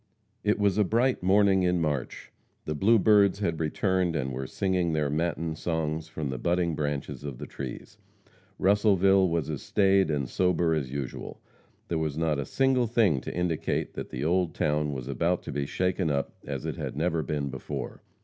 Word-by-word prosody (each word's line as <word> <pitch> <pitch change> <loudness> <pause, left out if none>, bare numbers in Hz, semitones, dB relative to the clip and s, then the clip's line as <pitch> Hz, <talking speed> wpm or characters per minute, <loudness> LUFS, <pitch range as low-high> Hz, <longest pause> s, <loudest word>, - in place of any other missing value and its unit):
It 105 0 +2
was 100 -1 +2
a - - +6
bright 120 +6 +1
morning 95 +1 +4
in 90 -1 +2
March. 75 -5 -3 0.3
The 75 - -2
blue 105 +10 +4
birds 100 -1 +4
had 85 -6 -1
returned 90 +2 0
and 65 -3 -2
were 65 +1 -4
singing 90 -2 0
their 75 -2 0
matin 80 0 -1
songs 80 -1 -2
from 75 -3 -4
the 65 - -4
budding 85 +3 +1
branches 75 -2 -3
of 70 -4 -6
the - - -6
trees. 65 -3 -8 0.6
Russellville 95 -1 +4
was 85 -4 -1
as 75 -3 -4
staid 95 -2 +3
and 70 -4 -1
sober 85 +1 +1
as 70 -5 -2
usual. 70 -2 -5 0.5
There 85 - -1
was 75 -2 -2
not 80 -3 0
a 70 - -2
single 130 -2 +2
thing 105 - +2
to - - -6
indicate 85 -3 -1
that - - -6
the 65 +4 -4
old 90 -1 +1
town 75 0 0
was 65 -3 -5
about 85 +7 0
to - - -6
be 70 0 -2
shaken 90 0 0
up 70 -1 -1
as - - -4
it - - -3
had - - -5
never 80 +1 +1
been 75 -2 -2
before. 65 -1 -6
80 Hz, 190 wpm, -27 LUFS, 75-95 Hz, 0.6 s, a